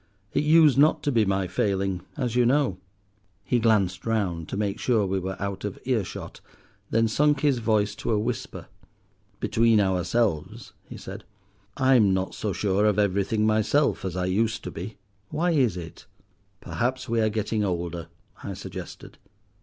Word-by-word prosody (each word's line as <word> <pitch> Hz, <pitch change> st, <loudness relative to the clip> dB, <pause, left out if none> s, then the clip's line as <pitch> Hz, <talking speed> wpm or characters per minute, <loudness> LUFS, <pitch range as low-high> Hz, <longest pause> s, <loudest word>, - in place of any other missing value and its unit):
"It -, -, +1 dB
used 150 Hz, -3 st, +5 dB
not 155 Hz, +1 st, +4 dB
to 145 Hz, -, +1 dB
be 115 Hz, -4 st, +3 dB
my 95 Hz, -1 st, 0 dB
failing, 95 Hz, 0 st, -1 dB, 0.2 s
as 125 Hz, -4 st, -2 dB
you 125 Hz, -, +4 dB
know." 125 Hz, -6 st, +2 dB, 0.6 s
He 125 Hz, -, +1 dB
glanced 100 Hz, -5 st, +2 dB
round 95 Hz, -8 st, -1 dB
to -, -, -4 dB
make 105 Hz, +1 st, -2 dB
sure 115 Hz, -5 st, +2 dB
we 95 Hz, 0 st, -1 dB
were 95 Hz, 0 st, -5 dB
out 100 Hz, -1 st, -4 dB
of 105 Hz, -2 st, -4 dB
earshot, 115 Hz, -7 st, -3 dB, 0.5 s
then 115 Hz, 0 st, +2 dB
sunk 145 Hz, +5 st, +2 dB
his 140 Hz, -4 st, +2 dB
voice 105 Hz, -2 st, +1 dB
to -, -, -4 dB
a 110 Hz, -, +2 dB
whisper. 115 Hz, +2 st, -4 dB, 0.7 s
"Between 115 Hz, -1 st, +3 dB
ourselves," 95 Hz, -2 st, -1 dB, 0.2 s
he -, -, -8 dB
said, -, -, -9 dB, 0.5 s
"I'm 125 Hz, -8 st, +4 dB
not 95 Hz, 0 st, -2 dB
so 105 Hz, -, -3 dB
sure 100 Hz, +3 st, +1 dB
of 105 Hz, -1 st, +2 dB
everything 100 Hz, +1 st, +1 dB
myself 110 Hz, +7 st, +2 dB
as 95 Hz, -2 st, -3 dB
I 90 Hz, -, 0 dB
used 110 Hz, +5 st, 0 dB
to 90 Hz, -, -5 dB
be. 90 Hz, +8 st, -7 dB, 0.3 s
Why 175 Hz, +3 st, 0 dB
is 125 Hz, -, +2 dB
it?" 80 Hz, -2 st, -9 dB, 0.5 s
"Perhaps 130 Hz, +2 st, -2 dB
we 115 Hz, -1 st, +1 dB
are 110 Hz, -, +2 dB
getting 110 Hz, 0 st, -1 dB
older," 85 Hz, -3 st, -3 dB, 0.4 s
I 100 Hz, -, -5 dB
suggested. -, -, -9 dB
105 Hz, 165 wpm, -25 LUFS, 95-120 Hz, 0.7 s, used